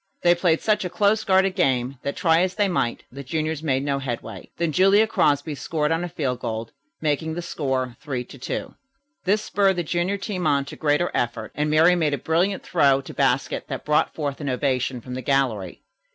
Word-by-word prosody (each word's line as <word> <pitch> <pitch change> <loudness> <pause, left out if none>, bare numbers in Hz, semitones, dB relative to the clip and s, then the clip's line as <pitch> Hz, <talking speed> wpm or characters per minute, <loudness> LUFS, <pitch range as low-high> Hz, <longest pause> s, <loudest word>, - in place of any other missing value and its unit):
They 175 0 +6
played 175 -2 +1
such 215 -1 +1
a 180 - -3
close 205 +4 +2
guarding 190 0 +3
game 130 -7 0
that, 140 - -3
try 165 -1 +3
as 185 0 0
they 205 -1 +2
might, 145 -10 -1
the 140 +2 -8
juniors 155 +2 -2
made 135 -4 0
no 140 -1 0
headway. 125 -4 -6
Then 170 -1 0
Julia 195 +6 +5
Crosby 150 -7 +1
scored 150 +1 -1
on 165 +1 0
a 175 - -4
field 140 -7 -2
goal, 115 -1 -4 0.3
making 160 +1 -1
the 175 - -4
score 130 -6 -2
3 135 -4 -3
to 130 +2 -14
2. - - -4 0.5
This 205 +3 +2
spurred 195 -2 +2
the 175 - -1
junior 175 +4 -1
team 190 -4 -3
on 140 -2 +2
to - - -9
greater 155 +3 +1
effort, 115 -2 -2
and 150 +1 -1
Miriam 165 +4 +5
made 150 -3 +1
a - - -6
brilliant 175 +8 0
throw 140 -6 +3
to 135 - -10
basket - - 0
that - - -5
brought 150 0 +2
forth 145 -2 -3
an 145 - -2
ovation 130 -1 -1
from 125 +2 -8
the 130 - -4
gallery. 125 -10 -1
150 Hz, 210 wpm, -23 LUFS, 135-175 Hz, 0.5 s, They